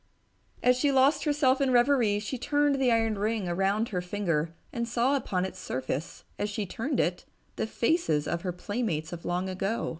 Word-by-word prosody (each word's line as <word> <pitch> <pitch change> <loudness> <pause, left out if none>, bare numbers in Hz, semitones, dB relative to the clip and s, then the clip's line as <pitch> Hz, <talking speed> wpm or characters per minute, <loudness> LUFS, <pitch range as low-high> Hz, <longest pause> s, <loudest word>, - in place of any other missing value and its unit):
As 250 0 +5
she 280 +3 +2
lost 270 +4 +3
herself 285 -3 +3
in 275 - +3
reverie, 245 -4 +4
she 215 +5 -4
turned 290 0 +1
the 250 -2 +4
iron 225 -2 +1
ring 215 -2 -1
around 195 +6 +1
her 180 -3 -2
finger 175 -4 -1 0.2
and 235 -1 -2
saw 240 +4 +2
upon 190 -9 -1
its 185 -1 -7
surface, 130 -1 -4 0.2
as 205 - -1
she 210 0 -3
turned 255 - -2
it, 175 +3 0 0.3
the - - -2
faces 230 - +1
of 170 - -2
her 180 - -2
playmates 180 -4 -3
of 170 - -8
long 180 +2 -1
ago. 195 +4 -2
215 Hz, 185 wpm, -28 LUFS, 180-255 Hz, 0.3 s, As